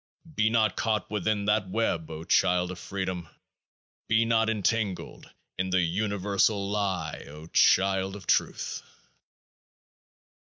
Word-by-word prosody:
Be 110 -5 +2
not 110 -3 +2
caught 110 -4 -1
within 105 0 -1
that 105 -2 +1
web, 90 -6 -1
O 80 0 -7
child 90 +1 +2
of 90 - -8
Freedom! 95 -4 -4 0.8
Be 110 +1 +3
not 115 -1 +2
entangled 105 -2 -2 0.3
in 95 0 0
the 95 0 +2
universal 100 +2 0
lie, 95 -6 -2
O 75 +2 -11
child 95 +3 +3
of 100 - -10
Truth - - 0
100 Hz, 120 wpm, -27 LUFS, 90-110 Hz, 0.8 s, Be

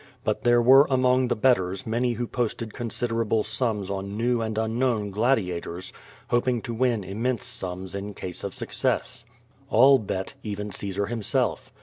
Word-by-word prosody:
But - - -1
there 120 0 +4
were 135 +4 +7
among 130 -1 +3
the - - +1
betters 100 -6 +1
many 120 +2 0
who 120 +1 -2
posted 115 -2 -3
considerable 115 -2 -1
sums 110 -3 -1
on 100 +1 -4
new 120 +1 +1
and 110 -1 -3
unknown 110 -1 0
gladia 100 -5 +1
tors, 90 +2 -6 0.4
hoping 120 0 +2
to 120 - -4
win 115 -3 +1
immense 115 +6 -2
sums 95 -7 -5
in 100 +1 -5
case 90 -2 -6
of - - -4
success. 115 - -2 0.4
All 135 +4 +6
l)et; 95 +6 -3
even 105 -2 -5
Caesar 100 0 -2
himself. 115 -1 -1
115 Hz, 155 wpm, -25 LUFS, 100-125 Hz, 0.4 s, were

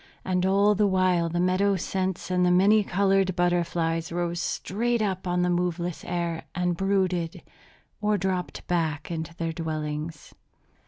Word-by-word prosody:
And 185 0 +1
all 200 +2 +4
the 205 0 +2
while 185 -3 +2
the 175 +1 -2
meadow 185 +3 +2
scents 185 0 -2
and 180 0 +2
the 180 - +4
many 200 +4 +5
colored 195 -1 +2
butterflies 170 -2 0
rose 175 0 -2
straight 235 +8 -1
up 190 -4 -2
on 180 0 +1
the 180 - +1
moveless 175 -1 -1
air, 170 -2 -2
and 180 0 0
brooded 185 -3 0 0.6
or 210 0 +2
dropped 185 -1 -3
back 160 -2 -1
into 165 0 -4
their 165 -1 -3
dwellings. 155 -1 -4
180 Hz, 150 wpm, -26 LUFS, 170-190 Hz, 0.6 s, many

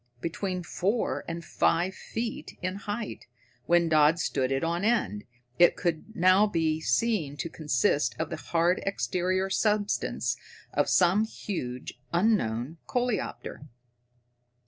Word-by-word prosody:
Between 180 +4 -3
four 205 +6 -1
and 170 0 -5
five 175 +3 +1
feet 225 +3 -5
in 185 +1 -1
height, 210 +2 -5 0.4
when 170 0 +4
Dodd 155 0 +5
stood 135 -5 0
it 135 +2 0
on 170 +3 -1
end, 105 - +1 0.3
it 175 - +6
could 175 +4 -3
now 185 +4 +5
be 160 -5 0
seen 160 - 0
to 165 - -3
consist 155 +1 +1
of 160 - -3
the - - -1
hard 170 +2 +1
exterior 185 0 0
substance 210 0 0 0.4
of - - +2
some 185 +4 +4
huge, 125 - -6
unknown 165 - +1
coleopter. 245 - -2
175 Hz, 125 wpm, -28 LUFS, 160-205 Hz, 0.4 s, it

